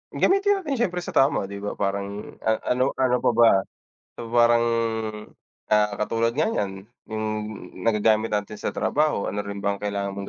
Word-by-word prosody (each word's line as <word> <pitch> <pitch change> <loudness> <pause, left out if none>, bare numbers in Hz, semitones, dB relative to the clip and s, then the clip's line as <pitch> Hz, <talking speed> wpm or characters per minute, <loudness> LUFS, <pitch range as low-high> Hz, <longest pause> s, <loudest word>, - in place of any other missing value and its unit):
gamitin 395 0 +2
natin 275 -6 -2
siyempre 180 0 -5
sa - - -6
tama, 135 -8 +2
'di 100 - -6
ba? 105 0 -4
Parang 100 +1 -4
a 110 0 0
ano 130 +2 +1
ano 130 -1 +2
pa - - +2
ba? 115 -1 +7 0.7
So, 115 -1 -7
parang, 120 0 +5 1.0
ah, 105 -1 +3
katulad 115 +2 0
nga 155 - +1
niyan, 95 - -3 0.2
yung 110 0 -2 0.6
nagagamit 110 0 +2
natin 105 0 -2
sa - - -3
trabaho. 140 +3 0
Ano 105 0 -2
rin 100 -1 -6
ba 100 0 0
ang - - -18
kailangan 100 -1 -2
mong 100 0 -5
110 Hz, 175 wpm, -24 LUFS, 100-125 Hz, 1.0 s, ba